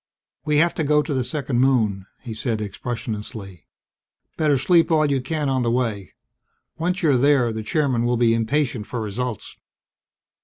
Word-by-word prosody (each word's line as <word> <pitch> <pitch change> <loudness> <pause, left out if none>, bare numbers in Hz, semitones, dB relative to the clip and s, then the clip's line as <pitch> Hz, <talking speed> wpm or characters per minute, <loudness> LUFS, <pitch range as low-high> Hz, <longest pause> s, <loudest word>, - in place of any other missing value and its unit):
"We 150 -1 +2
have 170 +3 +3
to 160 - -2
go 150 0 +3
to 150 - -3
the 130 -2 0
second 135 -2 -2
moon," 110 -8 +1
he 120 -3 -7
said 110 0 -2
expressionlessly. 105 -3 -6 0.7
"Better 150 -3 +2
sleep 165 +5 +3
all 155 -2 +3
you 140 -3 0
can 150 +2 -2
on 130 -1 +1
the 120 - +1
way. 115 -6 -2 0.6
Once 180 +3 -1
you're 145 -5 +4
there, 130 -3 +3
the 110 - -4
Chairman 130 0 0
will 120 0 +1
be 115 -1 +3
impatient 115 -1 -1
for 125 - -4
results!" 110 +2 -4
125 Hz, 165 wpm, -22 LUFS, 115-150 Hz, 0.7 s, you're